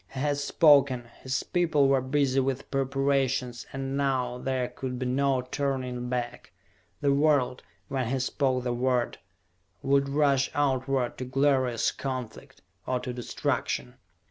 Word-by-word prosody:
He - - -3
had 145 +1 0
spoken, 140 -6 +4
his 130 0 -2
people 160 -6 +2
were 135 -1 +3
busy 135 0 +1
with 135 0 -2
preparations, 135 -2 0
and 135 0 -4
now 130 -3 0
there 130 -1 -1
could 125 0 -5
be 130 - -3
no 130 0 +1
turning 125 -2 -3
back. 125 -1 -4 0.5
The 140 -1 +3
world, 140 -3 +2 0.3
when 135 -4 -2
he 135 +3 0
spoke 130 0 0
the 125 -1 -1
word, 125 0 0 0.6
would 140 0 +2
rush 140 -2 +2
outward 135 -3 0
to 130 - -3
glorious 130 -2 +2
conflict 130 -4 -6 0.2
or 130 -1 0
to 125 0 -5
destruction! 120 -1 -2
130 Hz, 140 wpm, -27 LUFS, 125-140 Hz, 0.6 s, spoken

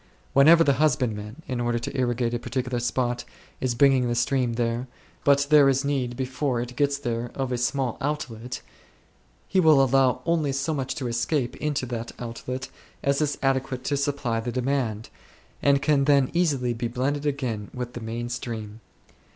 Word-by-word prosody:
Whenever, 160 +5 +7
the 140 - +3
husbandman, 125 -3 0
in 125 -3 -2
order 120 0 0
to 120 - -5
irrigate 120 -2 0
a 120 - -1
particular 125 +1 -2
spot, 120 0 -1 0.4
is 125 -2 -1
bringing 130 -1 +4
the 120 - 0
stream 120 0 +1
thither, 120 +1 -1 0.4
but 140 0 +4
there 145 -2 +7
is 135 +1 +1
need 130 -4 -1
before 130 -1 -1
it 125 +1 -5
gets 140 +1 +1
there 120 -3 -3
of 135 -2 -2
a 125 - 0
small 125 0 -1
outlet, 125 -5 -4 0.9
he 190 - +2
will 155 -5 +6
allow 135 -1 +3
only 160 -4 +1
so 135 +4 -1
much 135 -3 -2
to 135 -5 -3
escape 120 +2 -1
into 150 -3 -1
that 120 -2 -5
outlet 125 +2 -5 0.4
as 140 +2 +2
is 145 -1 0
adequate 130 -1 0
to 145 - 0
supply 140 -5 -1
the 120 +2 -3
demand, 125 -4 -1 0.5
and 140 -1 +3
can 140 -2 +3
then 140 -2 +4
easily 140 -9 +1
be 120 +1 -2
blended 140 +5 -1
again 125 -8 -2
with 125 -1 -5
the 120 - -6
main 115 +2 -4
stream. 115 -3 -6
130 Hz, 175 wpm, -25 LUFS, 120-140 Hz, 0.9 s, Whenever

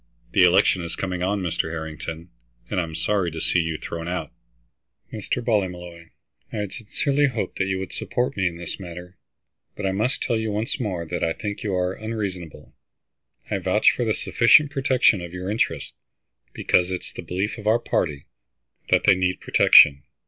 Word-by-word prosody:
The 95 - +4
election 90 +1 +4
is 85 - -5
coming 90 -2 -3
on, 100 +2 0
Mr. 85 -2 -1
Harrington, 80 +1 -6 0.4
and - - +1
I'd 85 - -4
be 80 - -8
sorry 100 -1 0
to 80 0 -7
see 90 - +1
you 80 -1 -1
thrown 85 +1 -6
out." 90 0 -3 0.8
"Mr. - - -3
Ballymolloy, 90 -6 -2 0.4
I - - -7
had 105 -2 -3
sincerely 140 +5 0
hoped 120 -5 -4
that 95 - +2
you 95 -1 -1
would 95 -1 -6
support 125 +1 -2
me 95 -2 +1
in 85 -1 -4
this 85 +3 -6
matter, 90 0 -10 0.6
but 100 - -5
I 95 - +1
must 110 +7 -1
tell 115 - 0
you 110 0 -2
once 110 +6 -2
more 95 -8 -3
that 90 +2 -4
I 80 - +1
think 105 +2 -5
you 105 -5 -2
are 90 0 0
unreasonable. 100 -7 -6 0.8
I - - 0
vouch - - +3
for - - -2
the - - 0
sufficient 150 0 +4
protection 130 - +3
of 85 0 -8
your 90 +2 -4
interests, 85 - -1 0.6
because 90 +1 +1
it 90 - -2
is - - -12
the - - -7
belief 95 +6 -3
of 105 - -6
our 110 +2 +5
party 75 -10 -2 0.6
that - - +3
they 100 - +6
need 90 0 0
protection. 70 -1 +6
95 Hz, 190 wpm, -23 LUFS, 85-105 Hz, 0.8 s, they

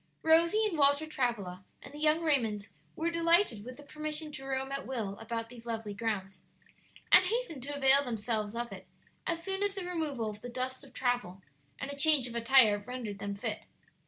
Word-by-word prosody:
Rosie 335 +7 +4
and 355 -7 -2
Walter 285 +2 +4
Travilla, 230 -11 -2 0.2
and 275 - -11
the 295 - -9
young 310 +2 +3
Raymonds 225 -9 +1 0.3
were 335 +1 -1
delighted 335 - +2
with 250 +2 -9
the 290 - -12
permission 305 +1 -4
to 270 -2 -8
roam 270 0 -2
at 275 0 -4
will 220 -7 -3
about 230 0 -4
these 235 -1 -12
lovely 225 -2 -4
grounds, 205 -3 -3 0.7
and 370 - +8
hastened 430 - -2
to 285 +3 -5
avail 275 0 +5
themselves 220 -3 -2
of 235 -1 -3
it 190 -1 -10 0.4
as 335 0 -1
soon 385 +1 -2
as 405 -1 +1
the 385 -2 -4
removal 310 -10 -2
of 210 0 -7
the 245 - -7
dust 255 +1 -4
of - - -14
travel 245 -7 -2 0.3
and 275 - -5
a - - -6
change 285 -3 +4
of 240 - -7
attire 230 -3 +5
rendered 215 -2 -6
them 200 0 -4
fit. 200 - -4
260 Hz, 195 wpm, -31 LUFS, 225-310 Hz, 0.7 s, and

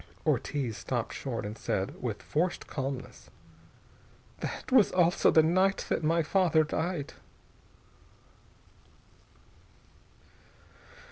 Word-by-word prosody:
_" - - -19 0.2
Ortiz 130 -7 -1
stopped 120 -3 -3
short 120 -6 -4
and 105 +1 -5
said, 95 -3 -2
in 120 -3 -1
forced 170 - -2
calmness: 135 -2 -6 1.1
"That - - -5
also 180 -7 +4
was - - 0
the 160 - +7
night 185 +4 +2
that - - 0
my 165 +2 +2
father 170 -1 +3
died." 160 0 -3
155 Hz, 95 wpm, -29 LUFS, 130-175 Hz, 1.1 s, the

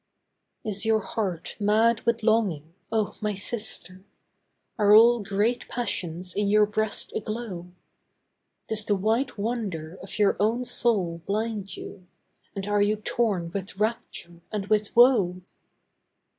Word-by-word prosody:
Is 205 -2 +2
your 220 -1 +2
heart 190 -6 -3
mad 220 +2 +3
with 230 -1 +1
longing, 195 -9 +1 0.2
oh, 220 -2 0
my 210 -1 -1
sister? 190 -3 -5 0.8
Are 205 0 +6
all 235 +2 +7
great 205 +4 -1
passions 180 -6 -2
in 205 0 0
your 210 +1 +5
breast 215 0 -2
aglow? 215 -5 -4 1.0
Does 220 -1 0
the 210 -1 +1
white 220 +7 0
wonder 200 -7 -3
of 190 - -6
your 205 -2 +3
own 230 +5 +1
soul 190 -10 +1
blind 210 -1 -2
you, 185 -2 -10 0.5
And 195 -1 -3
are 205 0 +2
you 205 +1 +3
torn 205 -5 -1
with 190 0 -5
rapture 195 -5 -3
and 210 -2 -3
with 210 -1 +1
woe? 205 -8 +5
210 Hz, 130 wpm, -26 LUFS, 190-225 Hz, 1.0 s, all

